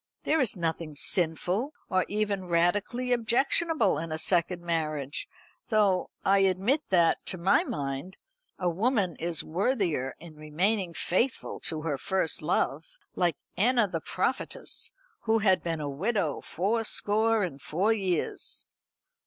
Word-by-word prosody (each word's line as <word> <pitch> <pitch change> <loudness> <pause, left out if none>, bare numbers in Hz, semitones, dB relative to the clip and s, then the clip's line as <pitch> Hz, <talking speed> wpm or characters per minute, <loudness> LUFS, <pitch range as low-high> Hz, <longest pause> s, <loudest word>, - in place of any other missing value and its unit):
There 315 0 +2
is 250 - 0
nothing 165 -3 -3
sinful, 180 - 0
or 185 0 +1
even 205 -2 -1
radically 205 +9 +1
objectionable 240 - +2
in 165 0 -5
a 155 - -1
second 175 +1 +1
marriage; 155 -5 -2 0.4
though 205 -5 +2 0.2
I 195 +1 +5
admit 195 - +2
that, 170 -3 +3
to 185 - 0
my 185 +3 +3
mind, 140 +6 -4 0.4
a 180 - -1
woman 195 - +1
is 170 -2 -1
worthier 175 - 0
in 165 0 -11
remaining 170 +5 -1
faithful 235 +8 -1
to 155 -2 -1
her 145 -4 -2
first 190 -1 0
love; 155 +4 0 0.3
like 175 -5 +1 0.2
Anna 235 +3 +3
the 165 -4 -4
prophetess, 260 - -2 0.3
who 225 0 +3
had 195 -4 +3
been 165 -2 -2
a 150 - -3
widow 175 +2 -1
fourscore 220 +2 +1
and 140 -7 -4
four 195 +11 +1
years. 190 -6 -2
185 Hz, 135 wpm, -28 LUFS, 165-215 Hz, 0.4 s, I